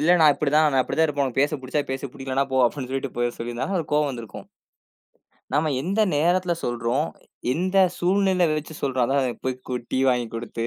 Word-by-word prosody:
இல்ல. 160 Hz, +4 st, +4 dB
"நான் 155 Hz, -2 st, +7 dB
இப்டி 145 Hz, -1 st, -1 dB
தான். 155 Hz, 0 st, +5 dB
நான் 135 Hz, -, +4 dB
இப்டி -, -, -4 dB
தான் 160 Hz, -, +5 dB
இருப்பேன். 145 Hz, -2 st, 0 dB
உனக்கு 130 Hz, 0 st, -1 dB
பேசப் 145 Hz, 0 st, +1 dB
பிடிச்சா 130 Hz, +3 st, -1 dB
பேசு, 135 Hz, +1 st, -3 dB
பிடிக்கலன்னா 135 Hz, 0 st, -1 dB
போ." -, -, +1 dB
அப்டின்னு 125 Hz, +1 st, -1 dB
சொல்லிட்டு 135 Hz, 0 st, -2 dB
போ -, -, -2 dB, 0.2 s
சொல்லியிருந்தா, 120 Hz, +1 st, -3 dB
அவருக்கு 170 Hz, -6 st, -2 dB
கோபம் 150 Hz, -1 st, +2 dB
வந்துருக்கும். 115 Hz, -6 st, -8 dB, 1.1 s
நாம 150 Hz, +2 st, +2 dB
எந்த 195 Hz, +8 st, 0 dB
நேரத்துல 175 Hz, +4 st, +2 dB
சொல்றோம், 120 Hz, +5 st, 0 dB, 0.5 s
எந்த 185 Hz, +5 st, 0 dB, 0.2 s
சூழ்நிலை 185 Hz, 0 st, +2 dB
வெச்சு 155 Hz, +1 st, -3 dB
சொல்றோம்? 130 Hz, -2 st, +1 dB
அதான் 135 Hz, -2 st, 0 dB
போய் 130 Hz, -1 st, 0 dB
கூ -, -, -2 dB, 0.2 s
டீ 130 Hz, -, +1 dB
வாங்கி 125 Hz, -2 st, 0 dB
கொடுத்து, 115 Hz, 0 st, -4 dB
140 Hz, 195 wpm, -24 LUFS, 130-160 Hz, 1.1 s, நான்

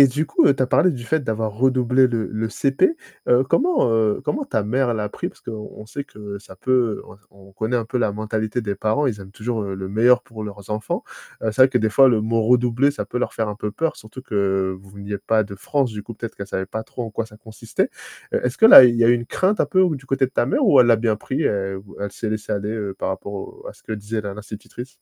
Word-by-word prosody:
et -, -, +9 dB
du 145 Hz, +5 st, -1 dB
coup, -, -, +3 dB
heu, 140 Hz, -, +5 dB
tu 130 Hz, -, +1 dB
as -, -, +1 dB
parlé 180 Hz, +7 st, +4 dB
du 120 Hz, -3 st, -7 dB
fait 160 Hz, +4 st, +1 dB
d'avoir 110 Hz, -3 st, -2 dB
redoublé 130 Hz, +2 st, +3 dB
le 115 Hz, -3 st, -2 dB
le 110 Hz, +1 st, -3 dB
CP, 135 Hz, -, +1 dB, 0.3 s
heu, 125 Hz, +2 st, +5 dB
comment, 300 Hz, -, +2 dB
heu 110 Hz, -2 st, +2 dB
comment 215 Hz, -, -1 dB
ta 110 Hz, -, -1 dB
mère 120 Hz, +3 st, 0 dB
l'a 105 Hz, -1 st, -2 dB
pris? -, -, -4 dB
Parce -, -, -18 dB
qu'on 110 Hz, -1 st, -8 dB
sait 140 Hz, +5 st, -5 dB
que 105 Hz, -1 st, -9 dB
ça 95 Hz, -1 st, -14 dB
peut 120 Hz, 0 st, 0 dB
on -, -, -14 dB, 0.3 s
on -, -, -19 dB
connaît 110 Hz, +5 st, -1 dB
un 115 Hz, -, -1 dB
peu 125 Hz, +2 st, -3 dB
la 110 Hz, -, +1 dB
mentalité 110 Hz, +2 st, -2 dB
des 100 Hz, -2 st, -2 dB
parents, 125 Hz, +8 st, 0 dB
ils 105 Hz, -5 st, -2 dB
aiment 95 Hz, 0 st, -12 dB
toujours, 110 Hz, +1 st, -3 dB
heu, 100 Hz, -1 st, -4 dB
le 95 Hz, 0 st, -5 dB
meilleur 120 Hz, +4 st, +4 dB
pour 110 Hz, -2 st, -9 dB
leurs 100 Hz, 0 st, -9 dB
enfants. 105 Hz, 0 st, -2 dB, 0.4 s
Heu, 110 Hz, -, 0 dB
c'est 120 Hz, -, -3 dB
vrai 130 Hz, -, +7 dB
que 130 Hz, -, -1 dB
des 110 Hz, -1 st, +1 dB
fois 135 Hz, +4 st, +6 dB
le 115 Hz, -3 st, +2 dB
mot 115 Hz, 0 st, +1 dB
redoubler 125 Hz, +3 st, +3 dB
ça 105 Hz, -, -4 dB
peut 120 Hz, +4 st, -4 dB
leur 125 Hz, -, -2 dB
faire 110 Hz, -2 st, -1 dB
un 105 Hz, -, -5 dB
peu 105 Hz, -1 st, -4 dB
peur 165 Hz, +4 st, -1 dB
surtout 110 Hz, +4 st, -11 dB
que 95 Hz, -4 st, -1 dB
veniez 100 Hz, +1 st, -7 dB
pas 110 Hz, +2 st, +1 dB
de 100 Hz, -1 st, -9 dB
France 135 Hz, +3 st, -1 dB
du 105 Hz, -1 st, -6 dB
coup 115 Hz, -, -9 dB
peut-être 115 Hz, +1 st, -7 dB
qu'elle 100 Hz, -, -6 dB
savait 95 Hz, -1 st, -3 dB
pas 110 Hz, +2 st, -5 dB
trop 125 Hz, -, -7 dB
en 115 Hz, -, -7 dB
quoi 110 Hz, +1 st, -3 dB
ça 105 Hz, -, -16 dB
consistait. 110 Hz, 0 st, -3 dB, 0.4 s
Est-ce 125 Hz, +1 st, -1 dB
que -, -, +2 dB
là 225 Hz, -, +12 dB
il 120 Hz, -1 st, +4 dB
y 115 Hz, -, +3 dB
a -, -, +5 dB
une 120 Hz, -1 st, +2 dB
crainte 195 Hz, +3 st, +1 dB
un -, -, +3 dB
peu 185 Hz, -1 st, +3 dB
ou 175 Hz, -4 st, +2 dB
du 135 Hz, 0 st, -14 dB
côté 135 Hz, 0 st, +1 dB
de 130 Hz, -, -12 dB
ta 120 Hz, -, +1 dB
mère 270 Hz, -, +1 dB
ou 140 Hz, -, +6 dB
elle 120 Hz, -, +5 dB
l'a 115 Hz, -, +5 dB
bien 110 Hz, -1 st, 0 dB
pris, 135 Hz, +8 st, -3 dB
elle 95 Hz, -5 st, -1 dB
ou 100 Hz, +1 st, -15 dB
elle 100 Hz, -1 st, -4 dB
s'est 110 Hz, 0 st, -4 dB
laissé 110 Hz, 0 st, -4 dB
aller, 105 Hz, +1 st, -2 dB
heu, 105 Hz, -3 st, -4 dB
par -, -, -2 dB
rapport 100 Hz, +1 st, -6 dB
au 100 Hz, -, -8 dB
à -, -, -8 dB
ce -, -, -23 dB
que 110 Hz, -, -7 dB
disait 110 Hz, +1 st, -3 dB
la 100 Hz, -, -5 dB
l'institutrice? 110 Hz, +4 st, -9 dB
110 Hz, 280 wpm, -21 LUFS, 105-125 Hz, 0.4 s, là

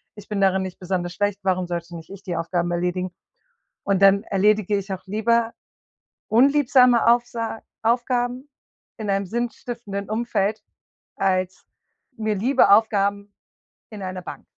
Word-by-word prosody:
Ich 210 Hz, -1 st, -12 dB
bin 210 Hz, -2 st, -3 dB
darin 190 Hz, -1 st, +3 dB
nicht 185 Hz, -1 st, -6 dB
besonders 180 Hz, -1 st, -3 dB
schlecht, 205 Hz, +1 st, -1 dB
warum 185 Hz, -1 st, +1 dB
sollte 170 Hz, 0 st, -5 dB
nicht 165 Hz, -1 st, -10 dB
ich 195 Hz, -, -10 dB
die 175 Hz, -, -4 dB
Aufgaben 170 Hz, +1 st, -1 dB
erledigen? 180 Hz, +1 st, -1 dB, 0.7 s
Und 200 Hz, -1 st, 0 dB
dann 195 Hz, +2 st, +5 dB
erledige 210 Hz, +1 st, +2 dB
ich 195 Hz, 0 st, -4 dB
auch 185 Hz, 0 st, -6 dB
lieber 230 Hz, +3 st, +1 dB, 0.8 s
unliebsame 250 Hz, -1 st, +4 dB
Aufsa 235 Hz, -1 st, +1 dB, 0.2 s
Aufgaben 245 Hz, +3 st, 0 dB, 0.5 s
in 215 Hz, -3 st, -5 dB
einem 195 Hz, 0 st, 0 dB
sinnstiftenden 235 Hz, -2 st, -4 dB
Umfeld, 215 Hz, -2 st, -1 dB, 0.5 s
als 185 Hz, -1 st, -1 dB, 0.5 s
mir 215 Hz, -1 st, -1 dB
liebe 220 Hz, +1 st, +3 dB
Aufgaben 200 Hz, -1 st, +3 dB, 0.6 s
in 215 Hz, -2 st, -9 dB
einer 185 Hz, 0 st, -5 dB
Bank. -, -, -9 dB
200 Hz, 135 wpm, -23 LUFS, 185-230 Hz, 0.8 s, dann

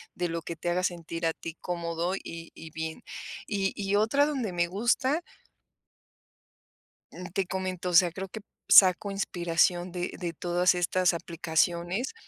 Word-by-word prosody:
de 175 Hz, -1 st, -1 dB
lo 165 Hz, 0 st, -3 dB
que 170 Hz, +1 st, -6 dB
te 175 Hz, -, -3 dB
haga 180 Hz, +1 st, 0 dB
sentir 170 Hz, -2 st, -3 dB
a 165 Hz, -, +1 dB
ti 165 Hz, 0 st, -8 dB
cómodo, 170 Hz, +1 st, -2 dB
y 165 Hz, -3 st, -8 dB
y 160 Hz, -1 st, -10 dB
bien. 160 Hz, 0 st, -5 dB, 0.4 s
Y 195 Hz, -2 st, 0 dB
y 200 Hz, 0 st, -1 dB
otra 220 Hz, +8 st, +3 dB
donde 265 Hz, -9 st, -2 dB
me 175 Hz, 0 st, +1 dB
gusta 240 Hz, -, +1 dB, 1.9 s
Mm, 180 Hz, -, -8 dB
te 195 Hz, -1 st, 0 dB
comento. 185 Hz, -1 st, -3 dB
O 180 Hz, -, -3 dB
sea, 175 Hz, 0 st, +6 dB
creo 190 Hz, +3 st, -6 dB
que 220 Hz, -, -7 dB, 0.3 s
saco 190 Hz, +1 st, +7 dB
inspiración 175 Hz, -2 st, +1 dB
de 180 Hz, 0 st, -3 dB
de 175 Hz, -2 st, -3 dB
todas 175 Hz, +2 st, +2 dB
estas 180 Hz, +1 st, +2 dB
aplicaciones. 170 Hz, -, -1 dB
180 Hz, 155 wpm, -28 LUFS, 170-195 Hz, 1.9 s, saco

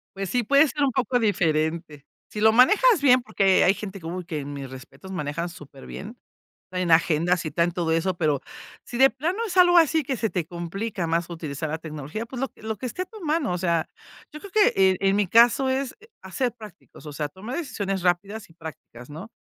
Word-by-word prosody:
Pues 195 Hz, -1 st, -4 dB
sí, 245 Hz, -1 st, 0 dB
puede 280 Hz, +6 st, +5 dB
ser 290 Hz, +2 st, -2 dB
un 270 Hz, -, +2 dB
poco 255 Hz, 0 st, 0 dB
diferente. 160 Hz, -, -1 dB, 0.2 s
Si 210 Hz, -, -6 dB
lo 220 Hz, 0 st, +6 dB
manejas 390 Hz, -, +5 dB
bien, 255 Hz, -3 st, +5 dB
porque 195 Hz, -5 st, +2 dB
hay 190 Hz, -, +5 dB
gente 195 Hz, -1 st, -7 dB
que, 165 Hz, -, -14 dB
¡uy!, 180 Hz, +1 st, -5 dB
que 155 Hz, -5 st, -5 dB
mis 140 Hz, -2 st, -7 dB
respetos. 130 Hz, +8 st, -12 dB
Manejan 165 Hz, 0 st, -3 dB
súper 140 Hz, -5 st, -13 dB
bien, 225 Hz, +6 st, -8 dB, 0.5 s
traen 180 Hz, -2 st, -2 dB
agendas 165 Hz, +2 st, +3 dB
y 155 Hz, -, -3 dB
traen 170 Hz, +1 st, +1 dB
todo 165 Hz, -2 st, -1 dB
eso. 175 Hz, +2 st, 0 dB
Pero, 150 Hz, -5 st, 0 dB, 0.4 s
si 240 Hz, -, -7 dB
de 270 Hz, 0 st, +7 dB
plano 315 Hz, -, -3 dB
es 375 Hz, -2 st, -6 dB
algo 355 Hz, -1 st, +6 dB
así, 320 Hz, -1 st, +3 dB
que 265 Hz, 0 st, -2 dB
se 225 Hz, -1 st, -1 dB
te 175 Hz, -4 st, -2 dB
complica 175 Hz, +3 st, -4 dB
más, 165 Hz, +1 st, -1 dB
utilizar 155 Hz, -2 st, -5 dB
la 160 Hz, +2 st, -3 dB
tecnología, 155 Hz, +7 st, -6 dB
pues 250 Hz, +1 st, -7 dB
lo 270 Hz, -, -1 dB
que -, -, -22 dB
lo 220 Hz, -1 st, -3 dB
que 255 Hz, -, -6 dB
esté 360 Hz, +9 st, -4 dB
a -, -, -4 dB
tu 430 Hz, +1 st, -13 dB
mano. 305 Hz, -, 0 dB
O 180 Hz, -, -2 dB
sea, 170 Hz, -3 st, 0 dB, 0.4 s
yo 305 Hz, -, -9 dB
creo 400 Hz, -2 st, -12 dB
que, 425 Hz, -2 st, +4 dB, 0.2 s
eh, 185 Hz, -, 0 dB
en 195 Hz, 0 st, +2 dB
mi 205 Hz, -2 st, +2 dB
caso, 240 Hz, +6 st, +5 dB
es 265 Hz, 0 st, -1 dB, 0.3 s
a 190 Hz, -, -11 dB
ser 250 Hz, +1 st, 0 dB
prácticos. 215 Hz, -9 st, -14 dB
O 150 Hz, -, -7 dB
sea, 150 Hz, 0 st, -3 dB
tomar 205 Hz, -, -7 dB
decisiones, 195 Hz, -, -3 dB
rápidas 195 Hz, +4 st, -1 dB
y -, -, -19 dB
prácticas, 150 Hz, -6 st, -11 dB
¿no? 180 Hz, +10 st, -9 dB
190 Hz, 225 wpm, -24 LUFS, 165-250 Hz, 0.5 s, de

